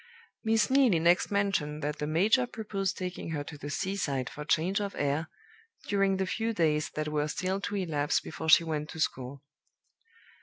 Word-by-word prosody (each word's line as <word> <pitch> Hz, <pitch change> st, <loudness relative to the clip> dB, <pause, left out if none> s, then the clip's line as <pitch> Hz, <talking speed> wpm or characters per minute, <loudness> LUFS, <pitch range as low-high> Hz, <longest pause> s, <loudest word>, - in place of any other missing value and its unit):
Miss 225 Hz, +1 st, +2 dB
Neelie 260 Hz, -9 st, +5 dB
next 175 Hz, +3 st, +3 dB
mentioned 180 Hz, -8 st, 0 dB
that 150 Hz, +1 st, -2 dB
the 150 Hz, -, -2 dB
major 210 Hz, +11 st, +3 dB
proposed 200 Hz, -4 st, -3 dB
taking 180 Hz, -2 st, -5 dB
her 145 Hz, -2 st, -2 dB
to 150 Hz, -, -9 dB
the 145 Hz, 0 st, -7 dB
seaside 145 Hz, -7 st, -2 dB
for 150 Hz, -, -7 dB
change 170 Hz, +6 st, +1 dB
of 200 Hz, -1 st, -4 dB
air, 145 Hz, +3 st, 0 dB, 0.6 s
during 195 Hz, -1 st, +2 dB
the 190 Hz, -, 0 dB
few 225 Hz, +4 st, -1 dB
days 155 Hz, -5 st, +1 dB
that 155 Hz, 0 st, -2 dB
were 150 Hz, 0 st, 0 dB
still 185 Hz, +5 st, -2 dB
to 205 Hz, -, -3 dB
elapse 155 Hz, -7 st, 0 dB
before 160 Hz, -, -5 dB
she 165 Hz, -, +8 dB
went 150 Hz, -2 st, -3 dB
to 160 Hz, -, -8 dB
school. 135 Hz, -2 st, -2 dB
165 Hz, 180 wpm, -29 LUFS, 150-200 Hz, 0.6 s, she